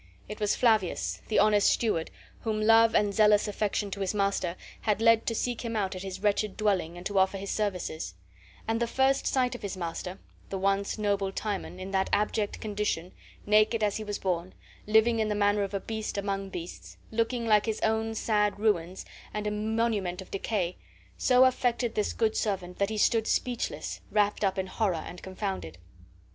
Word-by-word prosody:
It 210 Hz, -, -7 dB
was 210 Hz, -1 st, +1 dB
Flavius, 220 Hz, -7 st, +1 dB
the 215 Hz, -, 0 dB
honest 210 Hz, -1 st, +5 dB
steward, 210 Hz, -9 st, 0 dB, 0.3 s
whom 220 Hz, -2 st, -2 dB
love 225 Hz, +1 st, +5 dB
and 205 Hz, -1 st, +3 dB
zealous 210 Hz, 0 st, +4 dB
affection 205 Hz, -1 st, -1 dB
to 200 Hz, -, -5 dB
his 195 Hz, +1 st, -1 dB
master 195 Hz, -3 st, 0 dB, 0.3 s
had 210 Hz, -2 st, +1 dB
led 230 Hz, 0 st, +4 dB
to 230 Hz, -, 0 dB
seek 245 Hz, +1 st, -2 dB
him 230 Hz, -1 st, -3 dB
out 195 Hz, -3 st, -1 dB
at 185 Hz, -, -6 dB
his 190 Hz, -1 st, -6 dB
wretched 205 Hz, -1 st, +1 dB
dwelling 185 Hz, -6 st, 0 dB
and 175 Hz, -, -10 dB
to 200 Hz, -1 st, +1 dB
offer 190 Hz, +1 st, +2 dB
his 195 Hz, 0 st, -5 dB
services; 180 Hz, -, -2 dB, 0.5 s
and 225 Hz, 0 st, 0 dB
the 235 Hz, -, +2 dB
first 265 Hz, +3 st, +2 dB
sight 255 Hz, -2 st, +1 dB
of 245 Hz, -, -7 dB
his 200 Hz, -2 st, -5 dB
master, 180 Hz, +2 st, -4 dB, 0.3 s
the 195 Hz, -, -3 dB
once 195 Hz, +2 st, 0 dB
noble 200 Hz, -2 st, 0 dB
Timon, 195 Hz, -2 st, -4 dB
in 190 Hz, +1 st, -6 dB
that 190 Hz, -1 st, +1 dB
abject 210 Hz, 0 st, 0 dB
condition, 205 Hz, -5 st, -2 dB, 0.3 s
naked 215 Hz, +2 st, +3 dB
as 205 Hz, -1 st, +1 dB
he 220 Hz, -, -5 dB
was 205 Hz, -1 st, -3 dB
born, 180 Hz, -1 st, -2 dB, 0.3 s
living 220 Hz, +2 st, +4 dB
in 220 Hz, -, +1 dB
the 210 Hz, -, 0 dB
manner 205 Hz, 0 st, +2 dB
of 200 Hz, 0 st, -2 dB
a -, -, 0 dB
beast 220 Hz, 0 st, -4 dB
among 195 Hz, -1 st, -2 dB
beasts, 175 Hz, -2 st, -8 dB
looking 230 Hz, +1 st, 0 dB
like 210 Hz, -1 st, +4 dB
his 220 Hz, -1 st, -1 dB
own 220 Hz, 0 st, 0 dB
sad 210 Hz, -2 st, +1 dB
ruins 190 Hz, -4 st, 0 dB, 0.3 s
and 210 Hz, 0 st, -2 dB
a 210 Hz, -, 0 dB
monument 210 Hz, -3 st, -1 dB
of 190 Hz, -, -9 dB
decay, 195 Hz, -3 st, -2 dB, 0.4 s
so 255 Hz, 0 st, +5 dB
affected 245 Hz, -2 st, +1 dB
this 210 Hz, -, 0 dB
good 220 Hz, -1 st, 0 dB
servant 185 Hz, -4 st, -2 dB
that 200 Hz, 0 st, +2 dB
he 220 Hz, -, -3 dB
stood 220 Hz, +1 st, +3 dB
speechless, 245 Hz, -2 st, -2 dB
wrapped 210 Hz, 0 st, +1 dB
up 195 Hz, -1 st, +1 dB
in 190 Hz, -, 0 dB
horror 190 Hz, 0 st, 0 dB
and 175 Hz, -, -9 dB
confounded. 95 Hz, -, -5 dB
210 Hz, 190 wpm, -28 LUFS, 190-220 Hz, 0.5 s, honest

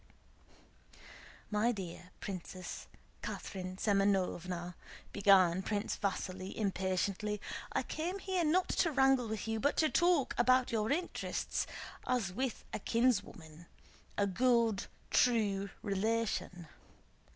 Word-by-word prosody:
"My 215 Hz, +3 st, +3 dB
dear 180 Hz, -4 st, -7 dB
Princess 185 Hz, -1 st, -6 dB, 0.3 s
Catherine 185 Hz, -2 st, -5 dB
Semënovna," 185 Hz, -4 st, +1 dB, 0.4 s
began 190 Hz, -3 st, +5 dB
Prince 205 Hz, +1 st, -2 dB
Vasíli 185 Hz, -1 st, -3 dB
impatiently, 195 Hz, +1 st, -1 dB, 0.3 s
"I -, -, 0 dB
came 350 Hz, +5 st, -3 dB
here 380 Hz, -2 st, -1 dB
not 350 Hz, +4 st, +2 dB
to 330 Hz, -, +2 dB
wrangle 265 Hz, -3 st, +4 dB
with 220 Hz, -1 st, -4 dB
you, 225 Hz, 0 st, -1 dB
but 285 Hz, +5 st, +1 dB
to 315 Hz, -, +4 dB
talk 345 Hz, -6 st, +3 dB
about 255 Hz, +1 st, +4 dB
your 220 Hz, +1 st, 0 dB
interests 345 Hz, +5 st, -1 dB, 0.4 s
as 230 Hz, -7 st, 0 dB
with 255 Hz, +2 st, -2 dB
a -, -, -2 dB
kinswoman, 200 Hz, -9 st, -1 dB, 0.5 s
a 200 Hz, -, +3 dB
good, 230 Hz, +1 st, +3 dB
kind, -, -, -7 dB, 0.2 s
true 205 Hz, -5 st, +3 dB
relation. 200 Hz, -4 st, -1 dB
210 Hz, 110 wpm, -34 LUFS, 190-250 Hz, 0.5 s, began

